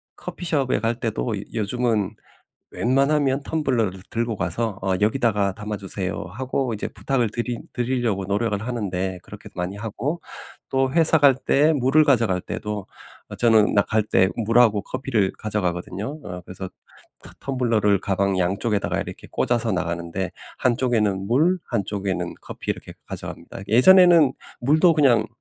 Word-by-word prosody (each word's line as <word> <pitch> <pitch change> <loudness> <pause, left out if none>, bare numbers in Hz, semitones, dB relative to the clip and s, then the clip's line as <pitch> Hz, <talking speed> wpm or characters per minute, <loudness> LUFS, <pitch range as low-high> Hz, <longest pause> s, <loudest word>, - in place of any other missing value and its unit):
커피숍에 145 -7 -1
갈 115 +1 0
때도 115 -2 -2
요 - - -5
요즘은 110 -1 0 0.6
웬만하면 135 +2 +1
텀블러를 120 - -1
들고 115 -1 -1
가서 95 +5 -2
어 95 0 0
"여기다가 105 -3 +1
담아주세요." 100 -2 -4
하고 130 +1 -2
이제 105 - -4
부탁을 125 -6 -1
드리 120 0 -3
드리려고 120 -5 -1
노력을 100 +1 0
하는데 95 -6 -3
그렇게 - - -11
많이 90 +3 -4
하고 115 +10 -3 0.5
또 135 0 +1
회사 165 0 +4
갈 140 -2 +6
때 150 +4 +3
물을 145 +3 +4
가져갈 115 -10 +2
때도 105 0 -5 0.4
어 - - -8
저는 110 -3 +4
나 100 - +5
갈 110 +1 +1
때 95 -2 +3
물하고 115 -2 +3
커피를 110 -7 -1
가져가거든요. 105 - -3
어 90 -1 -7
그래서 95 +1 -7 0.5
터 - - -13
텀블러를 115 -7 +1
가방 95 0 0
양쪽에다가 100 +4 0
이렇게 - - -8
꽂아서 120 -3 0
나가는데 85 +1 -2 0.3
한쪽에는 115 -6 +1
물 155 - +3
한쪽에는 100 -1 -2
커피 - - -6
이렇게 - - -5
가져갑니다. 95 - -7
예전에는 170 - +7 0.3
물도 155 +7 +4
그냥 125 -8 +4
115 Hz, 335 characters per minute, -23 LUFS, 100-130 Hz, 0.6 s, 예전에는